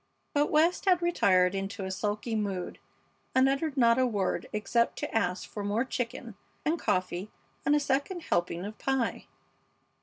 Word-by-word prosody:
But 290 0 +2
West 325 +6 +3
had 365 -2 +5
retired 185 - +3
into 195 0 -3
a 190 - -3
sulky 210 +4 -2
mood 200 -4 -2 0.6
and 260 +1 +6
uttered 275 +2 -1
not 235 -1 +5
a 255 - +4
word 205 -5 -1
except 235 +3 +1
to - - -4
ask 180 -4 0
for 205 - -6
more 210 +5 0
chicken 245 -2 -4 0.3
and 320 +2 +1
coffee 185 +2 -1 0.4
and 290 - +5
a - - +4
second 285 +5 -1
helping 175 - -1
of 215 +2 -8
pie. 265 -3 -1
230 Hz, 160 wpm, -29 LUFS, 195-275 Hz, 0.6 s, and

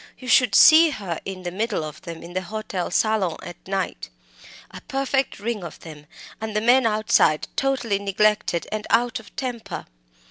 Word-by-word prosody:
You 255 - -11
should 245 -4 +4
see 320 +8 +8
her 195 - -5
in 190 -1 -6
the 175 - -4
middle 210 -2 -2
of 155 0 -8
them 170 -3 -8
in 170 +1 -10
the 185 - -1
hotel 195 -1 -4
salon 200 -3 +1
at 175 0 -11
night 190 - -3 0.6
a - - -10
perfect 270 0 -1
ring 220 -2 -3
of 170 - -9
them 150 -2 -12 0.3
and 220 -1 -5
the - - +3
men 245 +2 +4
outside, 215 -8 +2
totally 250 -7 0
neglected, 200 -2 +1
and 215 0 -4
out 240 0 +2
of 220 - -16
temper. 245 -4 -5
210 Hz, 175 wpm, -23 LUFS, 180-235 Hz, 0.6 s, see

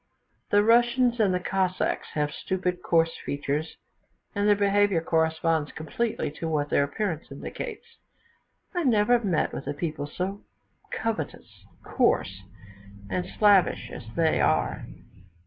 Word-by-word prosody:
The 205 0 +4
Russians 240 +2 +3
and 205 -4 +4
the 180 - +1
Cossacks 185 0 -1
have 150 -1 0
stupid 180 +1 -2
coarse 165 -1 +2
features, 145 +2 -3 0.6
and 205 0 0
their 205 - +6
behaviour 200 -2 +3
corresponds 160 -1 +1
completely 165 +4 -2
to 165 - -1
what 150 -2 -1
their 140 - +4
appearance 165 +2 -3
indicates; 450 -4 -6 0.9
I 355 - 0
never 240 -2 +4
met 190 -8 0
with - - -6
a - - -2
people 150 -2 -3
so 190 +6 -4 0.5
covetous, 220 -10 -4 0.2
coarse, 95 +1 +1 0.7
and 180 - -1
slavish 205 -3 +4
as 115 - -9
they 160 -1 +2
are. - - +1
180 Hz, 130 wpm, -26 LUFS, 160-210 Hz, 0.9 s, their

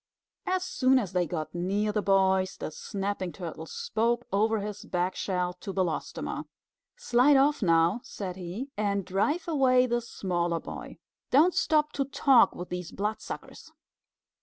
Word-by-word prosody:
As 370 0 +1
soon 265 -7 +3
as 200 -7 -2
they 180 -2 +1
got 155 -2 -4
near 195 +5 0
the 210 0 0
boys, 190 -1 +2
the - - -5
Snapping 195 0 -4
Turtle 165 -3 -7
spoke 235 +7 -1
over 220 +2 +2
his 210 0 -6
back 180 +1 -1
shell 180 -2 -1
to 200 - -5
Belostoma. 185 -4 -2 0.5
"Slide 280 - +4
off 285 +1 +3
now," 170 +3 +3
said 185 -3 -6
he, 190 +10 -6
"and 200 -2 -1
drive 250 - 0
away 260 -5 +4
the 240 -1 0
smaller 175 -6 -2
boy. - - -8 0.3
Don't 320 +7 +5
stop 305 -1 +2
to 275 - -1
talk 270 -2 +4
with 180 - -7
these 180 -1 -5
Bloodsuckers." 210 +2 -5
200 Hz, 150 wpm, -28 LUFS, 180-255 Hz, 0.5 s, Don't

